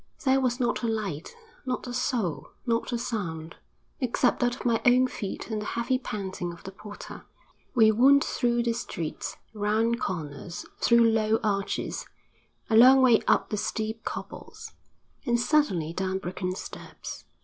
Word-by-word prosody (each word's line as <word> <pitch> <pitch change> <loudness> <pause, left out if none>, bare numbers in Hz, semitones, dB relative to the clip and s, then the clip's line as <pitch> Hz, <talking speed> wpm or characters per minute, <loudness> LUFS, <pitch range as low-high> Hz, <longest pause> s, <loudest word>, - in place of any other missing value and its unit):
There 265 0 +4
was 250 -1 0
not 240 -2 0
a 235 - 0
light, 200 - -3 0.3
not 255 -1 -3
a 245 - -5
soul, 240 - -1 0.2
not 230 0 0
a 240 - 0
sound 180 -10 -4 0.4
except 250 -1 +1
that 245 0 +1
of - - -10
my 235 -2 +2
own 250 +1 +5
feet 220 -2 -5
and 215 -1 -1
the - - -5
heavy 255 +2 +1
panting 190 -7 -4
of 170 - -12
the 190 - -7
porter. 205 +1 -10 0.5
We 220 -2 +6
wound 270 +6 +6
through 240 -1 +1
the 235 -1 +1
streets, 170 -8 -5 0.2
round 220 +3 +1
corners, 165 -1 -4
through 235 -1 +5
low 220 0 +2
arches, 200 -2 -1 0.6
a 220 - +1
long 260 +3 +8
way 240 -3 +6
up - - +3
the 210 - 0
steep 220 +1 -3
cobbles, 445 0 -7 0.5
and 240 0 +1
suddenly 235 - +2
down 190 +1 -1
broken 185 0 -3
steps. - - -8
225 Hz, 160 wpm, -27 LUFS, 195-245 Hz, 0.6 s, long